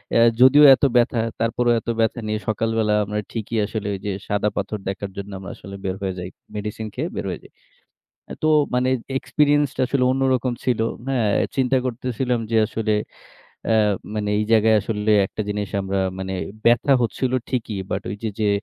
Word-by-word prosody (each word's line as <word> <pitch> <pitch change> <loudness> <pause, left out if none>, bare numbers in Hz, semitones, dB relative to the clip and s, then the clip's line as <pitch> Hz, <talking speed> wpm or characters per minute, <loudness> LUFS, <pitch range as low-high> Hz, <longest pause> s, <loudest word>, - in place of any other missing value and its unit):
এ - - +5 0.2
যদিও 135 +3 +8
এত 130 - -17
ব্যাথা, 120 0 +3 0.2
তারপরেও 120 +1 +1
এত 115 - -8
ব্যাথা 115 +2 +1
নিয়ে 110 0 -1
সকালবেলা 110 0 0
আমরা 105 +1 -3
ঠিকই 115 0 -3
আসলে 105 0 -4
ওই - - -7
যে 105 - -1 0.2
সাদা 105 +1 +1
পাথর 105 +1 -3
দেখার 100 0 -5
জন্য 100 +1 -6
আমরা 95 - -8
আসলে 100 +1 -10
বের 95 -1 -1
হয়ে 95 -1 -2
যাই। 90 0 -5 0.3
মেডিসিন 105 +1 -4
খেয়ে 155 +7 -3
বের - - -3
হয়ে - - -4
যাই। - - -17 0.8
আ - - -4
তো - - +3 0.3
মানে 125 +1 +2 0.3
এক্সপেরিয়েন্স 145 0 +2
টা - - 0
আসলে 130 0 +1
অন্যরকম 130 -2 +1
ছিল, 125 -3 +1 0.3
হ্যাঁ? 125 -6 +1 0.3
চিন্তা 130 0 +2
করতেছিলাম 125 0 -1
যে 115 - +3
আসলে 110 0 -1 0.8
এ - - +4 0.4
মানে 105 -1 -2
এই 105 - +1
জায়গায় 110 0 +5
আসলে 105 0 -2 0.2
একটা 110 - -7
জিনিস 105 -1 -2
আমরা 95 0 -2 0.2
মানে 95 0 -4 0.3
ব্যাথা 120 +4 +4
হচ্ছিল 125 +2 -1 0.2
ঠিকই। 115 -5 -2
বাট - - -2
ওই 100 - -4
যে, 115 - -1
যে 105 - +2
110 Hz, 185 wpm, -22 LUFS, 105-125 Hz, 0.8 s, যদিও